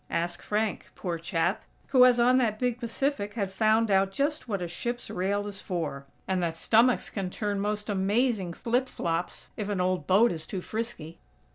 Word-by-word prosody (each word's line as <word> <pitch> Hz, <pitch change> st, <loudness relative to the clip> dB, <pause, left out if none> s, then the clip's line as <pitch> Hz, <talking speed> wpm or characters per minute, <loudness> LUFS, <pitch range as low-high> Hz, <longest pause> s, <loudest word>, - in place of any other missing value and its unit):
Ask 175 Hz, +1 st, -2 dB
Frank, 210 Hz, -1 st, -2 dB
poor 170 Hz, -2 st, -3 dB
chap, 170 Hz, +2 st, -1 dB, 0.3 s
who, 255 Hz, -2 st, +7 dB
as 245 Hz, -1 st, +5 dB
on 250 Hz, +2 st, +5 dB
that 220 Hz, -4 st, +1 dB
big 245 Hz, 0 st, -1 dB
Pacific, 235 Hz, -3 st, -2 dB
had 200 Hz, -4 st, -2 dB
found 220 Hz, +2 st, +2 dB
out 195 Hz, 0 st, +3 dB
just 285 Hz, +6 st, -1 dB
what 200 Hz, -4 st, -1 dB
a 175 Hz, -, -3 dB
ship's 240 Hz, +8 st, -4 dB
rail 200 Hz, +3 st, -1 dB
is 205 Hz, -1 st, -6 dB
for! 155 Hz, -7 st, -4 dB, 0.2 s
And 185 Hz, -1 st, 0 dB
that 165 Hz, -2 st, -1 dB
stomachs 230 Hz, +8 st, +3 dB
can 195 Hz, -3 st, -3 dB
turn 205 Hz, +1 st, -2 dB
most 210 Hz, +1 st, -2 dB
amazing 205 Hz, -1 st, +1 dB
flip 245 Hz, +7 st, 0 dB
flops 165 Hz, +1 st, -3 dB
if 210 Hz, -1 st, -3 dB
an 200 Hz, -2 st, -1 dB
old 180 Hz, -4 st, 0 dB
boat 210 Hz, +6 st, +5 dB
is 160 Hz, -2 st, -4 dB
too 190 Hz, -, -4 dB
frisky! 200 Hz, -6 st, -5 dB
205 Hz, 185 wpm, -28 LUFS, 180-230 Hz, 0.3 s, who